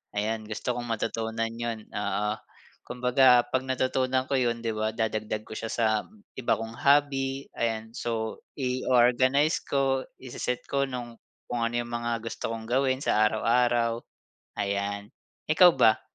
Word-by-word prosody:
ayan 110 +2 -1
gusto 110 +3 -3
kong 120 0 -4
matutunan 115 0 -2
yun, 115 -1 -4
oo. 105 +1 -1 0.6
Kumbaga 125 0 +5
pag 130 - 0
natutunan 130 0 +1
ko - - -1
yun 120 -2 0
di 115 - 0
ba 110 0 -1
dadagdag 110 -1 -2
ko - - -9
siya 115 - -4
sa 115 - 0 0.5
iba 130 - +1
kong 115 0 -6
hobby, 140 -1 +2
ayan. 110 -1 -2
So 110 -2 -3 0.2
i-o-organize 130 +2 +3
ko, 135 -1 +1 0.2
i-se-set 125 -1 -4
ko 140 0 +1
nung 120 -2 -6 0.3
kung 120 -1 -2
ano 115 +1 -2
yung 120 - -7
mga 120 0 -1
gusto 115 0 -4
kong 110 -1 -6
gawin 130 +1 +2
sa 105 - +2
araw-araw 115 +1 +2 0.6
ayan. 100 +1 -2 0.4
Ikaw 175 +3 +8
ba? 110 -4 +4
120 Hz, 145 wpm, -27 LUFS, 110-130 Hz, 0.6 s, Ikaw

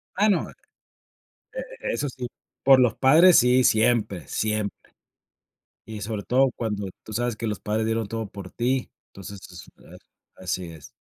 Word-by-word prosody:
Ah, 210 +3 +3
no, 180 -6 +1
e - - -14 1.3
e - - -2
eso 145 - -2
sí, 125 -1 -6 0.3
por 135 -1 +7
los 120 -3 +2
padres 160 +7 +6
sí, 125 0 +4
siempre, 110 -6 +2
siempre. 105 -1 -1 1.1
Y 110 -2 -7
sobre 105 -1 -4
todo 130 +1 +3
cuando 105 -4 -3
tú 110 - -11
sabes 120 -1 -1
que 115 - -4
los 105 -5 -3
padres 110 +1 -1
dieron 115 -1 -1
todo 115 -2 -4
por 95 -2 -10
ti, 125 +2 -1 0.2
entonces 100 0 -10
esto 90 - -14
a - - -13 0.5
así 90 0 -2
es. 80 -3 -13
110 Hz, 165 wpm, -24 LUFS, 105-125 Hz, 1.3 s, por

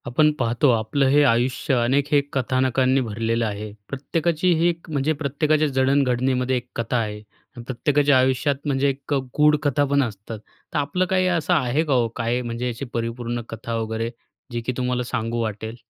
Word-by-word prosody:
आपण 150 +5 +3
पाहतो 120 +3 +2
आपलं 115 +5 +1
हे 145 +2 +5
आयुष्य 125 +4 0
अनेक 135 +4 +1
हे 145 -1 +5
कथानकांनी 130 0 +1
भरलेलं 115 0 -1
आहे. 105 0 -4 0.2
प्रत्येकाची 165 +5 0
ही 170 - +3
एक 170 0 -6
म्हणजे 150 0 0
प्रत्येकाच्या 155 +1 +1
जडण-घडणीमध्ये 130 -1 +1
एक 125 0 -7
कथा 115 +2 -1
आहे. 105 -2 -3 0.5
प्रत्येकाच्या 145 +2 +2
आयुष्यात 130 +2 +2
म्हणजे 140 -1 +1
एक 135 +2 -4
अ, - - +3 0.2
गूढ 150 0 +5
कथापण 140 0 +2
असतात. 105 -1 -6 0.3
तर - - 0
आपलं 180 +6 0
काही 185 -1 +2
असं 175 -1 +1
आहे 145 -1 +1
का 145 - 0
हो, 120 -2 +3
काय 120 +1 -1
म्हणजे 120 0 -3
याची 120 +3 -4
परिपूर्ण 120 +1 -3
कथा 115 +1 -5
वगैरे 110 +1 -3 0.4
जी 120 0 -3
की 130 - 0
तुम्हाला 125 -1 -1
सांगू 120 -1 -2
वाटेल? 110 +1 -4
130 Hz, 170 wpm, -23 LUFS, 115-145 Hz, 0.5 s, हे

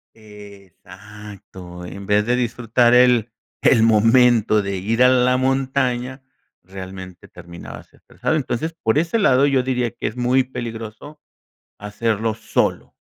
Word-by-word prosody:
Exacto, 100 -3 -13
en 100 +3 -9
vez 105 0 +2
de 120 +2 +1
disfrutar 120 0 +1
el 125 -2 +4 0.3
el 115 - +4
momento 115 -1 +3
de 100 -1 -4
ir 115 +6 0
a 125 - +6
la 125 0 +2
montaña, 130 -1 -1 0.4
realmente 95 0 -10
terminabas 85 -1 -12
estresado. 160 - -4
Entonces, 155 +2 -3
por 110 +5 +1
ese 170 +7 -1
lado, 140 - +3
yo 135 -2 +1
diría 125 -2 -1
que 120 - -5
es 110 - -6
muy 125 +1 +1
peligroso 120 +3 -8 0.6
hacerlo 110 +1 -2
solo. 110 - -2
115 Hz, 130 wpm, -20 LUFS, 105-125 Hz, 0.6 s, a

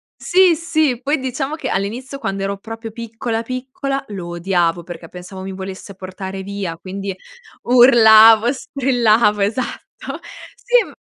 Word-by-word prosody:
Sì, 365 -1 +4
sì, 315 -6 0
poi 290 +4 0
diciamo 265 +2 -3
che, 295 -5 -5
all'inizio, 240 +8 -3
quando 195 -6 -3
ero 200 0 -2
proprio 225 +2 -8
piccola, 230 0 -4
piccola, 260 +3 -4
lo 190 -4 -6
odiavo 175 -1 0
perché 170 -1 -9
pensavo 180 +2 -10
mi 190 0 -6
volesse 190 +1 -8
portare 190 +1 -7
via, 195 -4 -5
quindi 195 +2 -6 0.5
urlavo, 225 -2 +7
strillavo, 240 -7 +1
esatto. 230 +5 -4 0.4
Sì, - - +2
m - - -13
225 Hz, 135 wpm, -19 LUFS, 195-260 Hz, 0.5 s, urlavo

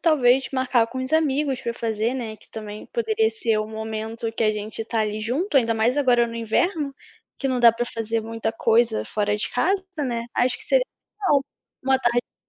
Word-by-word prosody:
talvez 265 -5 +4
marcar 255 -3 +2
com 260 - -7
uns 260 +3 -4
amigos 285 -4 +1
para 235 -2 -3
fazer, 225 +1 -1
né, 230 -4 -4 0.2
também 215 -1 -7
poderia 445 -1 +1
ser 230 - 0
o 215 - -1
momento 220 +1 -4
que 225 - -2
a 215 - +4
gente 210 +1 -5
está 225 0 -1
ali 215 0 -2
junto, 275 - +1
ainda 230 -2 +1
mais 235 +6 +2
agora 245 -4 +4
no 230 - -7
inverno, 275 - 0 0.4
que 275 - -1
não 255 -2 0
dá 235 -1 +9
para 235 +2 -2
fazer 225 -1 -2
muita 225 0 -3
coisa 225 0 +2
fora 210 0 0
de 210 - -3
casa, 380 +8 +1
né? 240 -5 -1
Acho 250 0 +2
que - - -10
seria - - +3 0.4
legal, 290 -8 +3 0.4
uma 265 0 +3
tarde 240 -1 +2
de - - -68
240 Hz, 200 wpm, -24 LUFS, 225-270 Hz, 0.4 s, dá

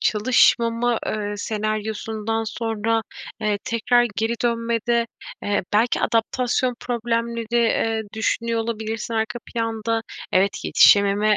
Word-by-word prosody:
çalışmama, 230 +1 +3
eee, 205 -1 -2
senaryosundan 215 +1 -2
sonra, 225 0 -1 0.4
eee, 210 -1 0
tekrar 240 +1 +2
geri 225 +1 0
dönmede, 235 0 0 0.4
eee, 205 -1 0
belki 225 +4 +2
adaptasyon 245 +2 +1
problemleri, 235 -1 -2
eee, 225 -1 +2
düşünüyor 230 +1 0
olabilirsin 225 0 -4
arka 220 +1 -1
planda. 225 -1 -2 0.3
Evet, 195 +2 +1
yetişememe, 205 +1 +5
225 Hz, 100 wpm, -22 LUFS, 215-235 Hz, 0.4 s, yetişememe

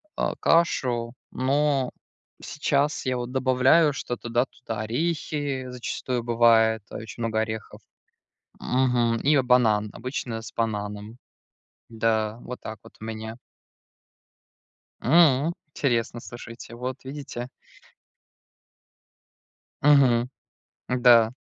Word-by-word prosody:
а, - - -1
кашу. 125 -8 +1 0.2
Но 135 0 +1 0.5
сейчас 145 0 0
я 130 -1 0
вот 120 0 -4
добавляю 130 +4 +4
что-то, 120 -2 -5
да, 120 +2 +2
туда. 115 -4 -7
Орехи 145 +1 -2
зачастую 125 0 -3
бывает. 115 -2 +4
Очень 110 +1 -8
много 110 -1 0
орехов. 110 -1 -5 0.8
Мгм. 125 -2 +1
И 145 -1 +5
банан, 110 -4 +3
обычно 125 -3 -4
с - - -9
бананом. 105 0 -3 0.7
Да, 110 -1 0
вот 125 - -7
так 110 0 -7
вот - - -16
у - - -8
меня. 110 0 -6 1.7
М. 155 +1 +4 0.2
Интересно, 120 -5 -1
слушайте. 115 0 -10
Вот 125 +1 -5
видите. 130 -3 -7 2.3
Мгм. 130 -5 +5 0.7
Да. 120 -2 +6
120 Hz, 100 wpm, -25 LUFS, 115-130 Hz, 2.3 s, Да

